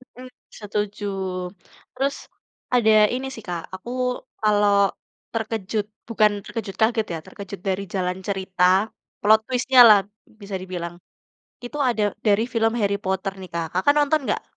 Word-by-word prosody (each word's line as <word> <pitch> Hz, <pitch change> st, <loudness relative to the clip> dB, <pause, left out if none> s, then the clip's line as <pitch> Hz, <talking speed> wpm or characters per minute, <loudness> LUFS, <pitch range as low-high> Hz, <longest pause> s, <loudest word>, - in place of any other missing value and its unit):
Mhm, 255 Hz, +1 st, -10 dB, 0.2 s
setuju. 210 Hz, 0 st, -4 dB, 0.9 s
Terus, 275 Hz, +2 st, 0 dB, 0.6 s
ada 225 Hz, -3 st, +4 dB, 0.2 s
ini 265 Hz, +1 st, -3 dB
sih 225 Hz, -, -10 dB
Kak, 175 Hz, -1 st, -3 dB
aku 185 Hz, +5 st, -10 dB, 0.5 s
kalau 205 Hz, -1 st, +3 dB, 0.6 s
terkejut, 220 Hz, -2 st, -2 dB, 0.2 s
bukan 215 Hz, -2 st, +3 dB
terkejut 200 Hz, -5 st, -5 dB
kaget 220 Hz, 0 st, +3 dB
ya, 165 Hz, -, -3 dB
terkejut 200 Hz, -1 st, -9 dB
dari 190 Hz, +1 st, 0 dB
jalan 180 Hz, -1 st, -1 dB
cerita, 190 Hz, -2 st, -1 dB, 0.6 s
plot 215 Hz, +1 st, +6 dB
twist-nya 255 Hz, 0 st, +3 dB
lah, 210 Hz, -2 st, +8 dB, 0.4 s
bisa 200 Hz, -1 st, -6 dB
dibilang. 175 Hz, -2 st, -5 dB, 0.7 s
Itu 270 Hz, +5 st, -6 dB
ada 230 Hz, -3 st, 0 dB, 0.2 s
dari 205 Hz, +1 st, +4 dB
film 225 Hz, -1 st, +2 dB
Harry 200 Hz, -2 st, +1 dB
Potter 190 Hz, +1 st, -1 dB
nih 185 Hz, -2 st, -9 dB
Kak, 170 Hz, -1 st, -1 dB
Kakak 190 Hz, +11 st, +3 dB
nonton 295 Hz, +1 st, +3 dB
nggak? -, -, -1 dB
210 Hz, 140 wpm, -23 LUFS, 190-230 Hz, 0.9 s, lah